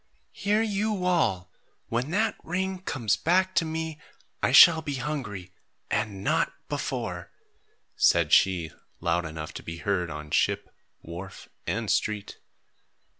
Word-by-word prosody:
"Hear 210 +2 +1
you 210 -2 -1
all! 95 - +1 0.4
When 120 +5 -1
that 215 +6 +1
ring 190 +2 -2
comes 125 - 0
back 185 +3 +2
to 165 - +2
me, 160 -1 -4 0.4
I - - +2
shall 165 -2 +9
be 145 -2 -4
hungry 120 -10 -5 0.4
and 100 -2 -1
not - - +1 0.2
before," - - -4 0.7
said - - +3
she, 90 -4 +4 0.3
loud 85 0 0
enough 80 0 -7
to - - -7
be 85 0 -7
heard 90 -2 -1
on 75 0 -7
ship, - - +1 0.3
wharf, 90 +4 -9 0.2
and 110 +5 -1
street. 105 -2 -1
120 Hz, 130 wpm, -27 LUFS, -, 0.7 s, shall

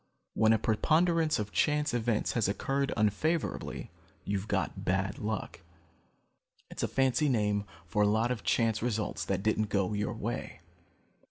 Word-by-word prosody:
When 110 0 +4
a 115 - +5
preponderance 160 +9 +2
of 105 -1 -3
chance 150 -2 +1
events 115 -2 0
has 115 -5 +1
occurred 135 +7 -1
unfavorably, 115 +11 -1 0.3
you've 100 0 -2
got - - -2
bad 95 +1 0
luck. 110 -4 -4 1.1
It's - - -5
a - - +1
fancy 135 +3 +2
name 105 -4 +1 0.2
for 105 +5 0
a 105 - +5
lot 110 +4 +2
of 125 - -3
chance 115 -2 +1
results 110 -3 -1
that 95 0 -1
didn't 110 -1 +1
go 100 0 0
your 105 0 -2
way. - - -5
110 Hz, 150 wpm, -30 LUFS, 105-130 Hz, 1.1 s, a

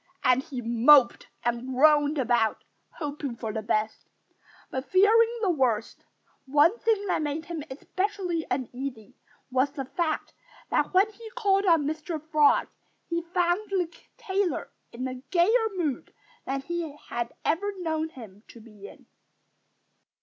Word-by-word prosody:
And 255 +1 +4
he 255 -2 -7
moped 235 +3 +5 0.2
and 240 +1 -1
groaned 295 +2 +4
about, 240 -4 +1 0.3
hoping 290 -4 -5
for 225 -2 -5
the 220 - -2
best, 215 0 -2 0.6
but 260 0 -4
fearing 450 +5 +4
the 380 - +3
worst. 245 -8 -1 0.4
One 300 - +4
thing 435 -3 +1
that 370 - 0
made 300 +2 -3
him 335 -3 -5
especially 365 +4 -2
uneasy 255 -2 -4 0.4
was 260 +2 +2
the 275 -2 -5
fact 315 +3 -2 0.4
that - - +1
when 380 +3 +4
he 445 +2 -11
called 400 -4 +2
on 330 -4 +4
Mr. 310 +2 -3
Frog 300 -2 +4 0.4
he 340 0 0
found 350 +3 0
the 355 -4 -1 0.2
tailor 395 -6 -2 0.2
in 255 +2 -4
a 255 -1 -7
gayer 445 +6 +3
mood 310 -8 -2 0.4
than 270 0 -2
he 325 -1 -4
had 240 0 -2
ever 400 +7 +1
known 320 -3 -2
him 215 -9 -12
to 235 - -14
be 210 -3 -13
in. - - -16
300 Hz, 140 wpm, -27 LUFS, 255-360 Hz, 0.6 s, moped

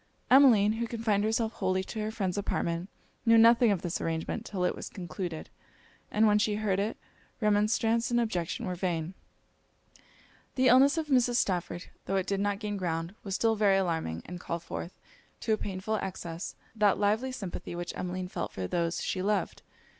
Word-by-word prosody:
Emmeline, 235 -6 +7
who 235 - -1
confined 220 -3 0
herself 220 +1 0
wholly 185 0 0
to 220 - -6
her 215 0 -1
friend's 195 -5 -2
apartment, 175 -3 -2 0.3
knew 230 -1 +6
nothing 230 +1 +6
of 200 -4 0
this 175 -2 -2
arrangement 165 +7 -2
'till 185 -3 -3
it 180 - +2
was - - -7
concluded: 175 -2 -5 0.6
and 215 +1 +3
when 210 -1 +4
she 210 0 +1
heard 205 -3 0
it, 210 +3 -1 0.4
remonstrance 220 +2 +2
and 240 0 +2
objection 185 -8 -2
were 185 - -2
vain. 175 -1 -2 1.4
The 260 -1 +4
illness 275 +5 +6
of 315 -2 -2
Mrs. 245 -3 +3
Stafford, 180 -5 -1 0.2
tho' 195 - 0
it 190 -1 +1
did 195 0 -1
not 205 0 0
gain 205 -1 -4
ground, 165 -1 -2
was 195 -2 -3
still 225 0 +2
very 205 -2 +4
alarming, 160 - -1
and 180 0 -7
called 170 -1 -4
forth, 175 - -7 0.4
to 220 - +1
a - - +2
painful 200 +2 -2
excess, 175 -3 -5 0.2
that 210 -2 +3
lively 215 +6 +1
sympathy 195 -7 -6
which 175 0 -4
Emmeline 180 0 -3
felt - - -4
for 95 - -4
those 170 - -1
she 185 - -2
loved. 205 +2 -1
200 Hz, 180 wpm, -29 LUFS, 180-220 Hz, 1.4 s, Emmeline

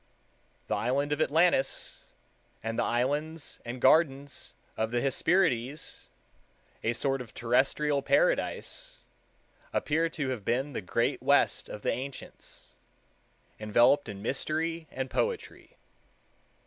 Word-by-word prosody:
The - - -2
island 140 +4 0
of 150 +1 0
Atlantis, 160 -2 +2 0.6
and 115 0 -2
the - - +3
islands 145 +6 -1
and 120 +1 -6
gardens 140 0 +2 0.2
of 110 0 -1
the 120 +1 0
Hesperides, 140 0 0 0.7
a 115 - +1
sort 135 +2 0
of 115 -4 -11
terrestrial 135 +4 +2
paradise, - - 0 0.7
appear 160 +2 +1
to 150 -4 -2
have 125 -6 -3
been 130 +7 0
the - - -3
Great 90 - 0
West - - +3
of 105 - -8
the - - +2
ancients, 135 +1 -7 0.9
enveloped 120 +6 +4
in 100 -1 -7
mystery 160 +6 -1
and 130 0 -3
poetry. 465 - -3
135 Hz, 115 wpm, -29 LUFS, 120-155 Hz, 0.9 s, enveloped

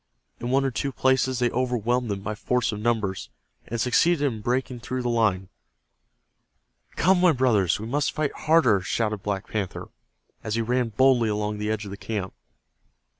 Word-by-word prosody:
In 120 - -4
one 135 +2 +2
or 135 - 0
two 140 +3 -2
places 130 0 +1
they 120 0 +1
overwhelmed 125 -1 0
them 100 -1 -3
by 110 +2 -3
force 120 +3 0
of 105 - -5
numbers, 105 -4 -1 0.4
and 115 - -4
succeeded 145 +7 +2
in 115 -6 -2
breaking 125 +2 -1
through 125 +2 -4
the 120 - -1
line. 105 -5 +1 1.5
"Come, 180 +1 +3
my 180 -3 +5
brothers, 115 - +2
we 110 - -6
must 145 +5 0
fight 150 -2 -2
harder!" 150 - +3
shouted 105 +2 -1
Black 100 -1 -3
Panther, 100 -4 -4 0.5
as 110 -1 -2
he 115 - 0
ran 125 +1 0
boldly 120 0 +3
along 105 0 -2
the 105 0 -2
edge 110 -1 -2
of 100 - -8
the 100 - -7
camp. 100 -4 -4
120 Hz, 175 wpm, -25 LUFS, 105-130 Hz, 1.5 s, my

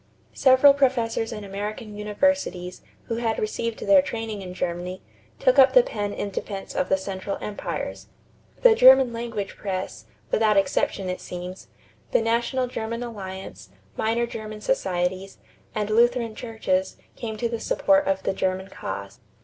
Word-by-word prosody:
Several 265 +2 +6
professors 240 -5 +1
in 210 -2 -6
American 205 +2 -5
universities, 210 -4 -1 0.2
who 230 - -3
had 230 -2 0
received 225 +1 -2
their 290 -1 +6
training 225 -6 -5
in 180 -1 -8
Germany, 180 +1 -4 0.3
took 255 +2 +3
up 265 -1 +7
the 250 -2 +7
pen 205 -3 -3
in 205 0 -4
defense 195 0 -5
of 185 - -1
the 190 - +3
Central 190 0 -4
Empires. 210 - -5 0.6
The - - +8
German 260 - +7
language 230 -4 -4
press, 190 -2 -4 0.3
without 215 -2 +3
exception 195 0 +1
it 180 0 -3
seems, 180 +1 -7 0.5
the - - +4
National 235 +3 +1
German 230 -1 -4
Alliance, 190 - -8 0.3
minor 230 +2 +1
German 215 -2 -7
societies, 190 - -1 0.4
and 210 0 -1
Lutheran 235 0 +3
churches 215 -5 -2 0.2
came 220 -2 -5
to 235 - 0
the 230 -1 -4
support 290 +5 +2
of 190 0 0
the - - 0
German 190 0 -2
cause. 100 - -7
215 Hz, 150 wpm, -25 LUFS, 190-235 Hz, 0.6 s, The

